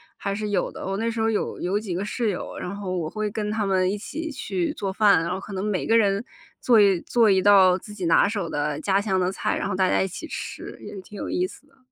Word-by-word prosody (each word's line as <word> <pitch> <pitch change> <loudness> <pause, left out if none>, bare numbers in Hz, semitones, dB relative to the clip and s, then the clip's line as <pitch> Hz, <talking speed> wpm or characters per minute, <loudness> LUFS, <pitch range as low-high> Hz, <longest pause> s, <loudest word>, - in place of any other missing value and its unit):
还 200 - -3
是 210 +1 -3
有 195 -3 0
的。 - - -8
我 195 0 -2
那 230 +2 0
时 230 - -4
候 225 0 +2
有 220 - -2
有 190 +3 0
几 195 -5 -4
个 195 - -2
室 225 +1 -1
友， 190 - -4
然 180 - -5
后 190 -2 -4
我 160 -3 -2
会 215 +2 -2
跟 210 0 -3
她 215 -1 -1
们 185 -1 +2
一 205 - -2
起 320 +9 -5
去 195 -10 -2
做 195 -2 -3
饭。 200 -4 +5
然 170 - -2
后 185 - -2
可 200 +1 -9
能 190 +1 -3
每 205 -3 -1
个 225 +1 +5
人 200 0 +2 0.4
做 235 -3 +5
一 195 -4 +4
做 230 -3 +3
一 190 -1 +4
道 190 -2 +6
自 210 - -11
己 195 -4 -4
拿 165 +4 +5
手 200 -5 -2
的 145 -1 -2
家 195 +4 +1
乡 195 -3 0
的 180 0 +1
菜， - - -1
然 - - -2
后 200 - -2
大 190 -1 +2
家 - - +2
一 - - -1
起 195 - -7
吃， - - -7
也 - - -9
挺 205 +2 -12
有 - - -5
意 180 +1 0
思 245 - -15
的。 275 -1 -29
200 Hz, 300 characters per minute, -24 LUFS, 185-215 Hz, 0.4 s, 道